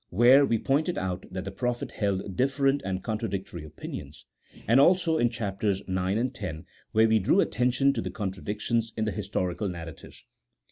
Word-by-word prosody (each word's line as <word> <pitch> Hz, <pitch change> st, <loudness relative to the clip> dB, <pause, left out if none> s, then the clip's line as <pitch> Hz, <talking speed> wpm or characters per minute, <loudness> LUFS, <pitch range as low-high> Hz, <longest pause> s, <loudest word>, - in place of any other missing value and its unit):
(where 125 Hz, +8 st, +6 dB
we 115 Hz, -, +2 dB
pointed 150 Hz, +9 st, 0 dB
out 90 Hz, 0 st, -3 dB
that 95 Hz, +1 st, -5 dB
the 95 Hz, -, -4 dB
prophets 125 Hz, -1 st, -3 dB
held 100 Hz, -2 st, -2 dB
different 135 Hz, +3 st, +2 dB
and 95 Hz, -1 st, -3 dB
contra 110 Hz, 0 st, -2 dB
dictory 95 Hz, -4 st, -5 dB
opinions), 75 Hz, -1 st, -9 dB, 0.4 s
and 115 Hz, +5 st, +5 dB
also 165 Hz, +1 st, +4 dB
in 120 Hz, -, +3 dB
Chaps. 105 Hz, -4 st, -5 dB
IX. 100 Hz, -2 st, +1 dB
and 100 Hz, +8 st, 0 dB
X., 90 Hz, -8 st, -5 dB, 0.3 s
where 110 Hz, 0 st, +4 dB
we 110 Hz, 0 st, +4 dB
drew 105 Hz, -, +3 dB
attention 130 Hz, -2 st, +2 dB
to -, -, -2 dB
the -, -, -4 dB
contradictions 105 Hz, +3 st, -2 dB
in 110 Hz, -, 0 dB
the 110 Hz, -, -1 dB
historical 95 Hz, +1 st, -2 dB
narra 85 Hz, -2 st, -6 dB
tives. -, -, -15 dB
110 Hz, 180 wpm, -27 LUFS, 95-125 Hz, 0.4 s, where